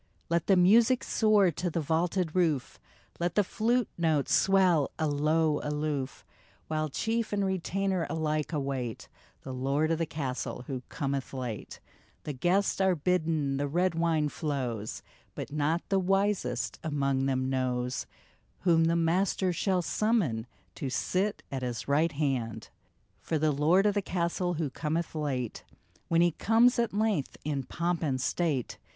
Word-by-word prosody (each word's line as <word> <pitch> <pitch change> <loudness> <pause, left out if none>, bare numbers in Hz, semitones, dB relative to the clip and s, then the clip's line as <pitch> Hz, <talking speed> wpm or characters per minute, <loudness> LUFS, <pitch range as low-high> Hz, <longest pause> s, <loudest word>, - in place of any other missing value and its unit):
Let 170 0 +1
the 195 - +5
music 230 +8 +5
soar 210 -4 +3
to 175 +4 -2
the 170 - -2
vaulted 165 +2 0
roof, 160 -8 0 0.4
Let 175 0 -1
the 205 - +4
flute 230 +4 +1
notes 155 -4 +1
swell, 185 -6 +4
alow, 155 0 +1
aloof, 150 -3 -3 0.4
While 155 -1 -1
chief 225 - -1
and 200 -1 +1
retainer 190 -1 -1
alike 155 0 -1
await 135 -6 -3 0.3
The 130 - -6
Lord 140 +5 0
of 165 - 0
the 165 - 0
Castle 130 -4 -4
who 130 -1 -4
cometh 140 -2 -3
late; 125 -5 -5 0.4
The 150 - -4
guests 185 +9 +1
are 190 -1 +3
bidden, 155 -4 0
the 145 +1 -1
red 175 +5 +1
wine 165 -2 +1
flows, 130 -9 -3 0.3
But - - -6
not 155 +3 0
the 195 - +3
wisest 190 - 0
among 140 -3 0
them 130 -1 0
knows 125 -1 -1 0.5
Whom 165 -3 +4
the 165 +1 +2
Master 180 +2 +1
shall 185 0 0
summon 170 - 0 0.3
To 135 - -3
sit 190 +9 -1
at 135 -1 -3
his 120 -2 -4
right 155 +3 +2
hand! 135 -7 -2 0.5
For 160 - -2
the 155 0 +2
Lord 160 +7 +3
of 205 - +3
the 205 - +1
Castle, 175 -1 -1
who 155 -4 -2
cometh 160 +3 -2
late, 135 -7 -3 0.4
When 165 0 +3
he 175 0 +4
comes, 230 +8 +3
at 235 - +1
length, 205 -8 0
in 145 -2 -1
pomp 170 +3 -1
and 135 -5 0
state. 140 -1 -1
160 Hz, 150 wpm, -29 LUFS, 140-185 Hz, 0.5 s, the